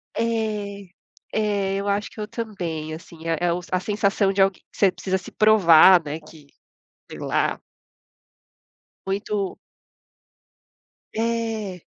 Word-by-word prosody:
É 210 -4 -2 0.5
é, 205 -2 0
eu 200 +1 -3
acho 200 +1 -1
que - - -13
eu 210 - -3
também, 175 -9 -5
assim, 165 0 -10
é 165 -1 +1
é 175 -1 +2
o 175 - -2
a 185 - +2
sensação 200 0 +1
de 195 - -3
alg 195 -1 +3
você 195 -2 +3
precisa 190 +1 -2
se 190 - -11
provar, 190 -4 +7
né, 150 +1 -5
que, 155 -1 -16 0.7
sei - - -8
lá - - 0 1.5
Muito 200 0 -2 1.6
É. 225 -5 -2
195 Hz, 125 wpm, -23 LUFS, 175-215 Hz, 1.6 s, provar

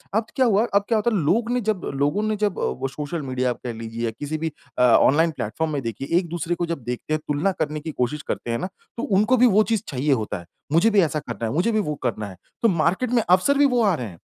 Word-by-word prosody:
अब 220 +1 +2
क्या 260 - +3
हुआ 215 0 +3
अब 200 - +4
क्या 225 - +3
होता 215 +3 +1
है - - +2
लोग 225 +10 +2
ने 250 - +1
जब 215 -4 -1
लोगों 145 +9 +1
ने 215 0 0
जब 205 -2 +1 0.3
वो 135 - 0
सोशल 150 +4 -4
मीडिया 130 -1 -1
कह 120 -1 -6
लीजिए 115 +1 -4
किसी 145 +7 -4
भी 160 +1 -2 0.3
अ, - - +3
ऑनलाइन 145 +7 +5
प्लेटफॉर्म 155 +5 -3
में 140 - -1
देखिए 115 +4 -4
एक-दूसरे 175 -1 -3
को 175 - -1
जब 165 -6 -4
देखते 125 +6 -4
हैं, 155 - +1
तुलना 150 +7 +1
करने 150 -1 -1
की 160 0 -5
कोशिश 140 +3 -2
करते 120 - -2
हैं 115 - 0
ना 185 - -2 0.3
तो 235 - -3
उनको 210 +6 +3
भी 250 +1 +6
वो 215 -1 +5
चीज़ 220 -3 +2
चाहिए 140 +1 0
होता 110 -5 -2
है, 85 - -12 0.3
मुझे 170 +7 +5
भी 205 -3 +4
ऐसा 155 -3 0
करना 115 -4 -5
है, 110 - -2
मुझे 180 +9 +2
भी 215 - +2
वो 150 -7 -2
करना 110 -4 -2
है। 95 - -12 0.3
तो - - +6
मार्केट 190 +7 +1
में 235 -3 +3
अफ़सर 185 +11 +4
भी 290 - +6
वो 250 -4 +3
आ 200 -3 +4
रहे 125 -5 -4
हैं, 85 -5 -12
160 Hz, 270 wpm, -23 LUFS, 130-210 Hz, 0.3 s, भी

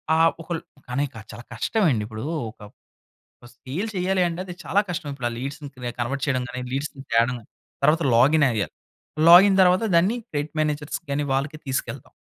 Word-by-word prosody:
ఆ - - +3 0.2
ఒకల్ 165 0 -4 0.3
కానీ 140 +4 0 0.3
చాలా 120 - -10
కష్టమండిప్పుడు 115 - 0 0.3
ఒక 110 - -16 1.0
సేల్ 155 - -4
చేయాలి 185 +1 +1
అంటే 170 +1 -5
అది 180 - -7
చాలా 200 - +2
కష్టం. 170 -3 -4
ఇప్పుడు 125 -3 -3
ఆ - - -6
లీడ్స్‌ని 140 +2 -6 0.3
కన్వర్ట్ 135 +3 -2
చేయడం 130 -2 +1
గాని, 125 0 -5
లీడ్స్ 140 +2 -2 0.2
తేవడం 120 +2 +3
కాని, 110 - -20 0.3
తర్వాత 160 +3 +4
లాగిన్ 145 +5 +5
అయ్యాలి. 105 -3 -2 0.6
లాగిన్ 190 +3 +9
తర్వాత 185 +4 +4
దాన్ని 190 +8 +4
క్రెడిట్ 145 0 -3
మేనేజర్స్ 150 -1 -1
కానీ 145 +1 0
వాళ్ళకి 145 +3 -1
తీసుకెళ్తాం. 135 -1 -4
145 Hz, 155 wpm, -24 LUFS, 130-170 Hz, 1.0 s, లాగిన్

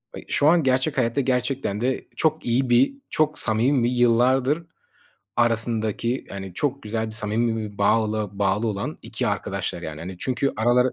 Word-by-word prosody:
ay, - - -8
şu 145 - +3
an 165 +1 +5
gerçek 135 +3 +1
hayatta 125 +2 +1
gerçekten 125 -4 -1
de 130 +2 -1
çok 160 0 +1
iyi 125 +2 +1
bir, 120 - +4 0.2
çok 155 0 +1
samimi 120 +3 +2
ve - - +3
yıllardır 125 +5 +2 0.7
arasındaki, 115 0 0
yani, 95 -2 -7
çok 140 +3 -1
güzel 110 +1 -2
bir 110 - -7
samimi 110 -1 -2
bağlı 110 0 +1
bağlı 100 +2 0
olan 100 -1 -4
2 - - -3
arkadaşlar - - -2
yani. 80 -1 -6
Hani, 90 +3 -7
çünkü 130 +4 0
araları 120 +3 +3
120 Hz, 160 wpm, -24 LUFS, 110-130 Hz, 0.7 s, an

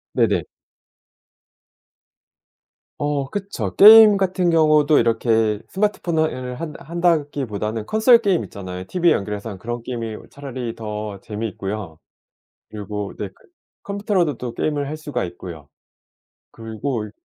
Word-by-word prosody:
네네. - - +2 2.6
어 145 -2 -1
그쵸. 200 0 -4
게임 215 0 +9
같은 185 -2 +1
경우도 155 -2 +4
이렇게 115 -2 +1
스마트폰을 160 -10 -1
한다 155 -2 -7
한다기보다는 140 - -1
콘솔 225 +2 +5
게임 200 -6 +1
있잖아요. 90 -2 -7
티브이에 175 -2 +3
연결해서 105 +2 -4
한 100 - -7
그런 120 +4 -5
게임이 115 -2 -5
어 - - -10
차라리 130 -4 -6
더 105 -2 -6
재미있고요. 105 -5 -5 0.7
그리고 105 -1 -5
네 105 - -4
그 - - -24 0.5
컴퓨터로도 200 - -1
또 125 -2 -5
게임을 145 0 -1
할 155 - -4
수가 145 -7 -4
있고요. 85 -4 -9 0.8
그리고 115 +1 -4
이 - - -12
125 Hz, 290 characters per minute, -21 LUFS, 105-165 Hz, 2.6 s, 게임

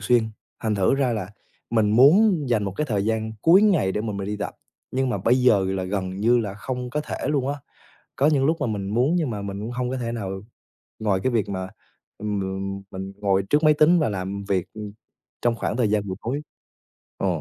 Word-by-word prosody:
xuyên. 110 +1 +2 0.3
Thành 110 -2 0
thử 100 +4 +3
ra 135 -3 +1
là 100 -4 -4 0.4
mình 110 -3 +2
muốn 155 - +5
dành 110 -4 +1
một 95 - -3
cái 150 - -1
thời 105 -6 0
gian 110 0 -1
cuối 180 +5 +6
ngày 170 - +3
để - - -1
mà 110 -1 -3
mình 100 0 -4
đi 105 - -3
tập, - - -4 0.4
nhưng 130 0 0
mà - - -1
bây 125 +3 +3
giờ 105 -6 +5
là 95 -1 -1
gần 95 -1 -2
như 115 +5 +3
là 105 -4 -3
không 125 +4 -5
có 150 - -1
thể 150 - -5
luôn 140 -3 0
á. 145 - 0 0.6
Có 140 - +3
những 140 -3 +3
lúc 160 +2 +2
mà - - +1
mình 100 -3 -3
muốn 130 +9 +2
nhưng 160 -6 0
mà 105 -3 -4
mình 100 0 -5
cũng 110 +3 -5
hông 125 0 -2
có 130 - -2
thể 115 -2 -3
nào 95 -4 -4 0.6
ngoài 105 -4 +1
cái 130 - +1
việc 110 -5 +1
mà, 95 -1 -3 0.5
ừm, 105 -1 -2 0.4
m 100 - -10
mình 95 +1 -6
ngồi 100 -1 +1
trước 150 +2 +3
máy 155 -1 +6
tính 155 +4 +5
và 150 - +1
làm 100 0 -4
việc, 95 -3 0
ừm, 105 -1 -7 0.5
trong 120 -1 +2
khoảng 115 - -2
thời 120 -4 +2
gian 105 -1 0
buổi 95 - -3
tối. 135 +6 -2 0.8
Ờ. - - -1
110 Hz, 235 wpm, -24 LUFS, 100-130 Hz, 0.8 s, cuối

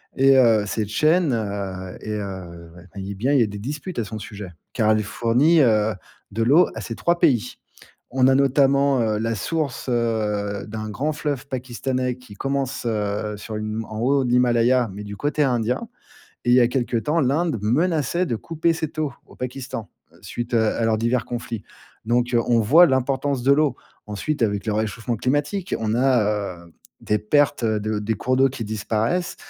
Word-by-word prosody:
et 135 0 +5
heu, 115 -5 +4
cette 105 0 -2
chaîne, 155 +3 +2
heu, 100 -4 -4
est, 105 0 -4
heu 90 -4 -7
ouais 85 - -13
eh 100 +1 -5
bien, 130 +8 0
il 140 - +5
y - - +5
a - - 0
des 100 0 -7
disputes 145 - -6
à 115 - 0
son 110 +1 -6
sujet, 100 -3 -8 0.2
car 110 -2 +2
elle 110 0 +3
fournit, 125 +10 +3
heu, 110 -3 +3 0.4
de 115 +2 -1
l'eau 150 +9 +5
à - - -5
ces - - -5
3 170 0 +1
pays. 125 -2 +2 0.6
On 130 0 +3
a 135 - +5
notamment, 140 0 +3
heu, 110 -2 +1
la 115 +1 -1
source, 150 - -3
heu, 105 -4 -1
d'un 110 0 -5
grand 150 +7 -1
fleuve 145 -2 -3
pakistanais 125 0 -3
qui 125 -5 -14
commence, 135 0 -2
heu, 105 -1 -2
sur 110 +1 -7
une 110 +1 -3
en 110 0 -7
haut 135 +3 +2
de 125 - -2
l'Himalaya, 120 -1 +3
mais 105 +1 -7
du 100 -1 -8
côté 150 +3 -1
indien. 125 - 0 0.6
Et 120 - +2
il - - +6
y - - +6
a 120 - +5
quelque 125 -2 -1
temps, 150 +8 +1
l'Inde 145 0 +1
menaçait 160 +7 +1
de 120 - -1
couper 165 +5 0
cette 160 -1 -5
eau 150 -4 -1
au - - -17
Pakistan, 125 -5 -5 0.3
suite, 120 0 -5
heu, 110 -1 +3
à 115 - -1
leurs 110 -1 +2
divers 115 +2 0
conflits. 120 -3 -5 0.4
Donc, 120 +1 +1
heu, 115 - +5
on 120 -1 +3
voit 160 +11 +7
l'importance 135 0 0
de 140 +2 +4
l'eau. 145 -3 +2 0.3
Ensuite, 115 +7 -3
avec 105 0 0
le 110 - 0
réchauffement 110 +2 -2
climatique, 145 - -1
on 110 0 0
a, 105 -7 +1
heu, 85 - -19 0.3
des 105 - 0
pertes 140 +2 +2
de 110 -1 0
des 110 +2 -1
cours 130 +5 -1
d'eau 135 +1 +5
qui 125 -4 -6
disparaissent, 110 - -1
120 Hz, 195 wpm, -22 LUFS, 110-135 Hz, 0.6 s, voit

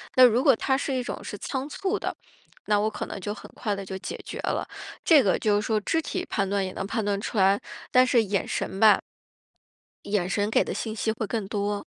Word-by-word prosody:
那 255 - +8
如 240 0 +4
果 275 -5 +6
他 265 +4 +1
是 275 0 -2
一 255 -1 -1
种 - - -5
是 - - -6
仓 265 0 -4
促 390 +6 -2
的， - - -3 0.5
那 210 -1 +3
我 215 +1 +1
可 210 - -5
能 - - -6
就 205 +2 -3
很 - - -11
快 210 -4 -2
地 195 - -5
就 190 0 -5
解 - - -5
决 - - -6
了。 - - -1 0.4
这 310 -4 +7
个 190 - +2
就 210 -1 +2
是 210 - +1
说 220 -1 +2
肢 325 +10 0
体 365 +3 -3
判 195 -2 0
断 200 -1 0
也 185 - -4
能 195 - -4
判 225 0 -1
断 200 -1 0
出 215 - -4
来， 195 +1 +4 0.3
但 255 0 +6
是 235 -3 +4
眼 200 -1 -1
神 190 - -3
吧 215 -2 +7 1.0
眼 200 -3 0
神 205 +2 0
给 - - +3
的 - - -4
信 220 -1 -4
息 220 0 0
会 220 0 -3
更 215 -1 -3
多。 205 0 -2
215 Hz, 260 characters per minute, -26 LUFS, 200-250 Hz, 1.0 s, 那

